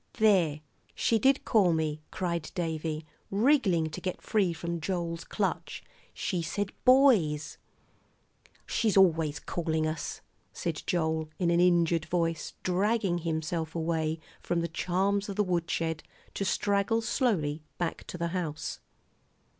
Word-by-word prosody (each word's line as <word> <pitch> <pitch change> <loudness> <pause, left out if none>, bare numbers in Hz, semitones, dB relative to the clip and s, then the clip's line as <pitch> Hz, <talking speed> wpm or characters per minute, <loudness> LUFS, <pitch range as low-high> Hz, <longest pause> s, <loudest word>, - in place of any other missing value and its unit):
"There, 180 -9 +3 0.3
she 225 - +2
did 270 +5 +3
call 195 -6 +4
me," 155 -1 -1
cried 170 -3 -2
Davie, 160 -2 -2 0.2
wriggling 195 - +3
to - - -6
get 185 -2 -3
free 200 -5 +1
from 170 0 -4
Joel's 170 -1 -2
clutch; - - -3 0.3
"she 180 -3 -2
said 200 +5 -2
'boys!'" 215 - +4 1.1
"She's 215 -4 +1
always 160 -6 +4
calling 160 -1 -1
us," 155 0 -3 0.3
said 165 -3 -3
Joel, 160 -2 0
in 175 -2 +1
an 170 - +3
injured 170 -2 +3
voice, 165 -2 -1
dragging 195 0 +1
himself 160 0 -2
away 160 -1 -1 0.2
from 170 -1 0
the 170 - -1
charms 195 +5 0
of 200 - -4
the 210 - +2
woodshed 165 -3 -1 0.3
to - - -2
straggle 200 +4 +1
slowly 200 - 0 0.2
back 175 -2 -2
to - - -6
the 170 0 -1
house. 165 -4 -3
170 Hz, 130 wpm, -29 LUFS, 160-195 Hz, 1.1 s, call